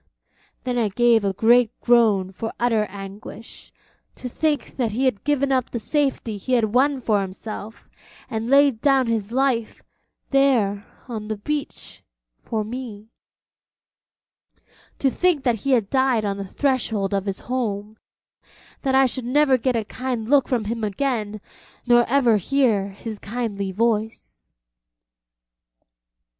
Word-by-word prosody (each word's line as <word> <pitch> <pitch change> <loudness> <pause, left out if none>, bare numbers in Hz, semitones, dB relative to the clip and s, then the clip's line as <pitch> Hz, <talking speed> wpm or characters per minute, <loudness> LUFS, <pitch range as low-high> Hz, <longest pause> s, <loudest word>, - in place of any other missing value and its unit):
Then 250 -1 -1
I 225 - +2
gave 230 +1 +3
a 200 - +1
great 230 +4 +3
groan 220 -6 +3
for 225 +4 -5
utter 230 -3 +2
anguish, 200 +3 -10 0.4
to 255 - -7
think 295 +4 -1
that 235 -5 -1
he 255 +5 0
had 235 -7 0
given 280 -2 +1
up 255 -2 +1
the - - -4
safety 265 -3 -1
he 255 +6 -3
had 220 -3 +2
won 275 +2 +3
for 215 -4 +1
himself, 210 +3 -8 0.4
and 225 +1 -4
laid 275 -4 +4
down 270 -2 +3
his 225 -2 -2
life, 250 -3 0 0.5
there 235 -7 +2 0.2
on 220 -4 -6
the 215 -1 -3
beach, 290 +7 -5 0.4
for 220 -1 -3
me; 225 -2 -8 1.9
to 270 - +1
think 350 -4 +1
that 240 -4 +1
he 275 +5 0
had 225 -5 +1
died 260 -5 +2
on 200 -1 -2
the 200 -1 -5
threshold 220 -6 -1
of 195 0 -1
his 195 -1 -3
home; 215 -4 -3 0.9
that 265 -2 +1
I 270 0 +6
should 255 0 -2
never 275 +2 +3
get 255 0 0
a 225 -2 -1
kind 250 0 -4
look 275 0 +4
from 245 -4 0
him 225 +2 -4
again, 215 -1 -2 0.5
nor 240 -1 +4
ever 245 -4 +4
hear 215 -3 +1
his 205 +2 -8
kindly 205 -4 -3
voice. 220 +1 -2
230 Hz, 145 wpm, -22 LUFS, 210-260 Hz, 1.9 s, I